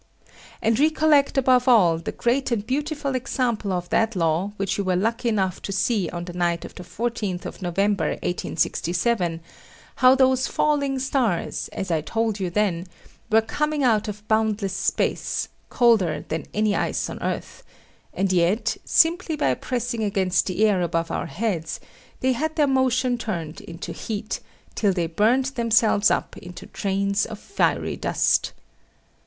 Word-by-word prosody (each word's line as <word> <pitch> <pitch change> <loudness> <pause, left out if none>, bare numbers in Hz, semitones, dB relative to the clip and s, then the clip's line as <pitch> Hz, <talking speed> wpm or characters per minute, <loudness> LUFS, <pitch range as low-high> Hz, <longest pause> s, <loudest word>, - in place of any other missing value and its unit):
And 225 +2 +2
recollect 305 -2 +3
above 255 -1 +3
all 180 -10 +5
the - - -5
great 260 +3 0
and 215 -3 -1
beautiful 285 +2 -2
example 245 -5 -1
of 180 -1 -2
that 225 -1 +1
law 170 +3 0
which 195 +1 -2
you - - +1
were 185 -1 +1
lucky 230 +5 0
enough 190 -5 -1
to - - -5
see 195 -1 0
on 175 0 -5
the 175 - -8
night 175 -1 -1
of - - -10
the - - -10
14th 205 -1 -3
of - - -7
November 195 +2 0 0.2
1867, 175 +1 -1 0.6
how 255 0 +6
those 260 0 +3
falling 285 -3 +1
stars, 255 -8 -1
as 190 -2 -4
I 160 -2 +1
told 225 +4 -1
you 185 -2 -1
then, 180 -2 0 0.4
were 220 0 +5
coming 300 +5 -1
out 220 -4 +2
of 210 0 -7
boundless 215 -3 +1
space, 190 - -1 0.2
colder 205 - +2
than 160 0 -3
any 210 -1 +1
ice - - -1
on - - -7
earth, - - -4 0.5
and 190 -1 0
yet, 195 +6 +1
simply 335 0 +3
by 135 - +1
pressing 240 - -3
against 190 -3 +1
the 195 +3 +2
air 200 -4 +2
above 165 -1 -1
our - - -2
heads, 170 -4 -3 0.4
they 260 - +2
had 310 +5 -2
their 300 - +3
motion 255 -2 +1
turned 170 -9 -4
into 170 +1 -8
heat, 215 -1 -4 0.3
till 205 -3 +1
they 175 -2 0
burned 215 +10 +2
themselves 225 -4 +3
up - - -1
into 180 0 -10
trains 200 +1 -1
of 220 - -7
fiery 400 - -1
dust. - - +1
215 Hz, 160 wpm, -23 LUFS, 180-250 Hz, 0.6 s, how